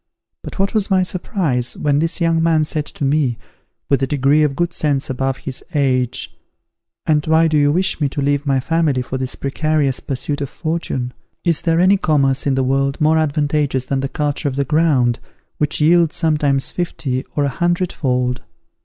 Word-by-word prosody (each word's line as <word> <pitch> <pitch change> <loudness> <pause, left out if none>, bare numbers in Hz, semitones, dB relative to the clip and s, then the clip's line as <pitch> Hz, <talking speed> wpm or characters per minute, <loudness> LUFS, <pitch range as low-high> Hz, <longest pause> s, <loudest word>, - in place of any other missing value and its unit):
But - - -9
what 195 0 0
was 215 -3 +1
my 190 -1 +3
surprise, 170 - -2
when 145 -1 +1
this 165 +3 0
young 165 -1 +2
man 165 -1 +3
said 150 0 -2
to 145 - -4
me, 135 -4 +1 0.5
with 140 -2 +2
a 135 - +1
degree 145 +2 +2
of 150 -3 +1
good 175 +2 -1
sense 145 -3 0
above 135 +1 -1
his 135 -2 -6
age, 130 -4 0 0.7
"And 150 -1 +2
why 160 +1 +4
do 155 - 0
you 145 -1 +4
wish 185 0 0
me 145 - +2
to 140 - -5
leave 145 0 +1
my 135 -2 +1
family 145 -2 0
for 130 +1 -4
this 130 0 -2
precarious 145 -1 0
pursuit 145 +2 -3
of 140 - -3
fortune? 145 -6 -3 0.3
Is 170 -3 +1
there 165 -1 +1
any 190 +3 +5
commerce 140 -6 +1
in 135 - +2
the 135 - +1
world 135 +1 0
more 155 +1 +3
advantageous 145 -3 0
than 135 +1 -1
the 135 0 -2
culture 145 0 -2
of 130 - -6
the 140 0 0
ground, 140 -6 +2 0.4
which 150 0 0
yields 165 +1 +4
sometimes 150 -4 +1
fifty 135 -7 -3
or 145 - +1
a 140 - +1
hundred 175 +5 0
fold? 125 -2 -1
145 Hz, 190 wpm, -19 LUFS, 135-160 Hz, 0.7 s, any